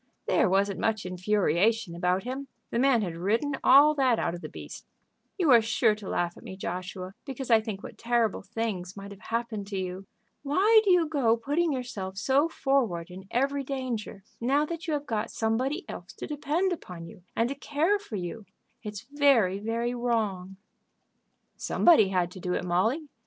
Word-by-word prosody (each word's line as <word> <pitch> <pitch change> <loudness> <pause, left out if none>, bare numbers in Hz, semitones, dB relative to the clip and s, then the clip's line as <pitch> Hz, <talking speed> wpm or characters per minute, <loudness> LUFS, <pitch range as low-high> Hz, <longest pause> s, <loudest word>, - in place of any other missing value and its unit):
"There - - +3
wasn't 195 +1 +1
much 220 -3 0
infuriation 185 +2 +1
about 180 +2 0
him. 265 +3 -5 0.2
The 235 - 0
man 255 -4 +4
had 175 -4 -4
ridden 225 - 0
all 285 +3 +7
that 260 -5 +2
out 170 - -1
of 175 - -7
the - - -7
beast." - - -10 0.5
"You 340 -7 +3
are 235 -2 +8
sure 225 0 +2
to 210 -2 -8
laugh 175 0 -1
at - - -14
me, 190 - -8
Joshua, 185 +1 -5
because 265 -2 -5
I 225 -1 +6
think 215 -3 -6
what - - -10
terrible 230 -2 +1
things 195 -3 -4
might 200 0 -8
have 200 - -11
happened 225 -3 -3
to 200 -1 -4
you. 185 +1 -5 0.3
Why 390 +10 +4
do 405 - +1
you 355 -3 +5
go 260 -7 +2
putting 295 +8 0
yourself 210 -8 -4
so 275 +9 +2
forward 230 - 0
in 190 +1 -10
every 275 +3 0
danger, 250 -7 -4 0.2
now 275 +5 +2
that 335 +2 -6
you 315 - 0
have 290 0 -4
got 225 -3 -2
somebody 255 - -1
else - - -8
to - - -7
depend 310 +5 0
upon 180 - -8
you 170 - -13
and 230 - +2
to - - -2
care 305 +8 0
for 395 - -8
you? 195 +3 -5 0.3
It's 210 -1 -6
very, 260 -10 +3
very 230 +3 -2
wrong." 215 -6 -1 1.0
"Somebody 315 - +4
had 180 -2 0
to 185 - -10
do 180 0 -2
it, - - -2
Molly. 220 - +1
225 Hz, 185 wpm, -28 LUFS, 190-275 Hz, 1.0 s, are